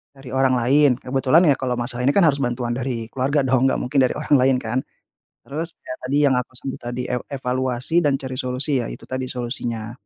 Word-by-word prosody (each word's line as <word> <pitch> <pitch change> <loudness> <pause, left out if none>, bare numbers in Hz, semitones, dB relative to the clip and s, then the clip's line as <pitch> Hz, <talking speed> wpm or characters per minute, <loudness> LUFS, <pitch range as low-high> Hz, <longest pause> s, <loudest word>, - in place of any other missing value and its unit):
dari 135 -1 -12
orang 130 -1 +3
lain, 130 +2 +4
kebetulan 135 +6 +3
ya 140 - +5
kalau 130 -2 -1
masalah 120 0 -3
ini 140 - +4
kan 200 - +5
harus 140 -2 +2
bantuan 120 -1 -1
dari 120 -3 -3
keluarga 140 +3 +1
dong, 130 0 +3
enggak - - 0
mungkin 135 +2 0
dari - - -1
orang 150 0 +2
lain 130 0 +3
kan. 115 +3 -1 0.7
Terus 160 +4 -5
ya 130 - -6
tadi 135 +3 0
yang 135 -2 +3
aku 125 - -3
sebut 135 +1 -5
tadi, 120 +1 -4
ev 125 -1 -1
evaluasi 130 +4 0
dan 145 -2 +3
cari 130 -1 -6
solusi 130 +2 -1
ya - - -4
itu - - -10
tadi 130 0 -3
solusinya. 120 -2 -4
130 Hz, 215 wpm, -22 LUFS, 125-140 Hz, 0.7 s, ya